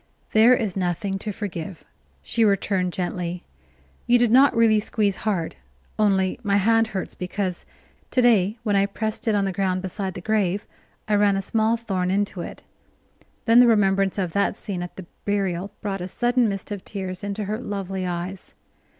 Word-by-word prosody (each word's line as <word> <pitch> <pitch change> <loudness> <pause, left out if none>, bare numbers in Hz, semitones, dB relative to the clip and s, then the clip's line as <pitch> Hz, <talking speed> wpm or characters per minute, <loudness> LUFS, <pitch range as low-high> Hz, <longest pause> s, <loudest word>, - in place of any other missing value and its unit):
"There 225 +3 +6
is 215 -6 -2
nothing 190 +1 -1
to 210 - -3
forgive," 185 -4 -6 0.4
she 230 - +1
returned 195 -3 +1
gently. 180 -1 -3 0.6
"You 245 - +6
did 240 -2 +2
not 265 +1 +6
really 225 -2 +5
squeeze 210 -2 0
hard, 185 - -2 0.4
only 195 -2 +2
my 200 -3 +2
hand 225 +3 +3
hurts, 195 -4 -4
because 185 0 -4 0.4
to - - 0
day 220 -4 +4
when 210 -3 +1
I 200 0 +3
pressed 220 +3 -3
it 220 - +3
on 200 -1 +2
the 195 - -1
ground 185 -1 -1
beside 190 0 -4
the - - -5
grave 205 -1 0 0.4
I 215 - 0
ran 205 -1 +4
a - - 0
small 225 +2 +1
thorn 190 -6 -2
into 195 -1 0
it." - - -8 0.8
Then 230 +1 +6
the 245 - +7
remembrance 195 -3 +3
of 185 -4 -1
that 200 0 +1
scene 190 -4 -5
at 175 - -7
the 190 - -9 0.2
burial 195 -2 -1
brought 195 -3 -3
a 180 - -3
sudden 240 +3 +1
mist 195 +1 -5
of 200 -2 -5
tears 190 -2 -5
into 205 +1 -3
her 210 +2 -3
lovely 195 -5 -4
eyes. 180 +2 -5
200 Hz, 180 wpm, -24 LUFS, 185-215 Hz, 0.8 s, the